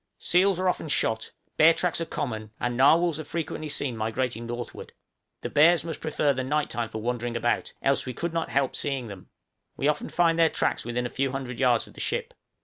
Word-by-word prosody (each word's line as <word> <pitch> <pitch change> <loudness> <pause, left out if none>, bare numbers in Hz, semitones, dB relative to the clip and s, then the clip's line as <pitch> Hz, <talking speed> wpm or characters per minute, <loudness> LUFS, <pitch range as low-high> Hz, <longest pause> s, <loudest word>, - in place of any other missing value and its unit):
Seals 185 +1 +3
are 185 - +1
often 180 - 0
shot, 110 -6 0 0.3
bear 165 +1 +7
tracks 180 -2 0
are 165 - -2
common, 110 -9 -4
and 120 0 -1
narwhals 160 +5 +4
are - - -4
frequently 155 -1 -4
seen 140 -4 -1
migrating 115 +1 -2
northward. 120 0 -7 0.5
The - - -4
bears 165 +1 +5
must 165 -2 -5
prefer 150 -2 +1
the 130 0 -2
night 150 +3 -1
time 120 -1 -2
for 110 - -5
wandering 120 0 -2
about, 120 +1 0
else 135 -1 +1
we 125 - -3
could 170 +4 -3
not 165 -1 -1
help 135 -1 0
seeing 135 -5 -2
them; 95 -3 -11 0.5
we 140 - +1
often 150 0 0
find 170 -1 +2
their 165 -1 +6
tracks - - 0
within 120 +1 -2
a - - -2
few 135 0 -1
hundred 130 -3 -5
yards 125 -3 +3
of - - -16
the - - -13
ship. - - -2
135 Hz, 215 wpm, -26 LUFS, 120-160 Hz, 0.5 s, bear